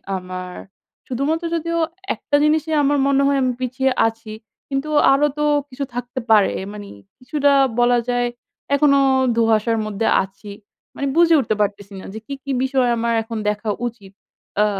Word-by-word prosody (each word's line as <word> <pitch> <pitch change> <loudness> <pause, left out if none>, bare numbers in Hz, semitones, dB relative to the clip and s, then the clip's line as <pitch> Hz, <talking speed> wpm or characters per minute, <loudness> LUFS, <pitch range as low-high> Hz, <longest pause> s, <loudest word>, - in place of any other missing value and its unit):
আমার 185 0 -6 0.5
শুধুমাত্র 295 +7 -1
যদিও 335 +1 -2 0.4
একটা 290 - -2
জিনিসই 310 +1 +1
আমার 285 +1 +2
মনে 275 0 +3
হয় 280 0 +2
আমি 255 - +1
পিছিয়ে 265 +1 0 0.2
আছি। 225 -1 -7 0.4
কিন্তু 275 +2 -2 0.2
আরো 275 +2 +4
তো 300 - 0 0.3
কিছু 270 +1 -5
থাকতে 245 +1 -4
পারে। 210 -2 +5 0.2
মানে 205 -1 -8 0.3
কিছুটা 285 +2 +1 0.3
বলা 245 0 +4
যায় 245 0 +1 0.5
এখনো 280 0 +4 0.4
ধোঁয়াশার 225 0 +2
মধ্যে 215 +1 -2 0.2
আছি। 195 +2 -12 0.5
মানে 280 - -2
বুঝে 335 -1 +5
উঠতে 220 -5 -1
পারতেসি 200 0 -3
না - - -10
যে, 220 - -6
কি, 280 - -5
কি 275 - -4
বিষয় 260 -2 +1
আমার 235 0 0
এখন 225 0 -6
দেখা 210 +1 -3 0.2
উচিত। 205 -5 -11 0.5
আ - - +4
245 Hz, 160 wpm, -20 LUFS, 215-280 Hz, 0.5 s, পারে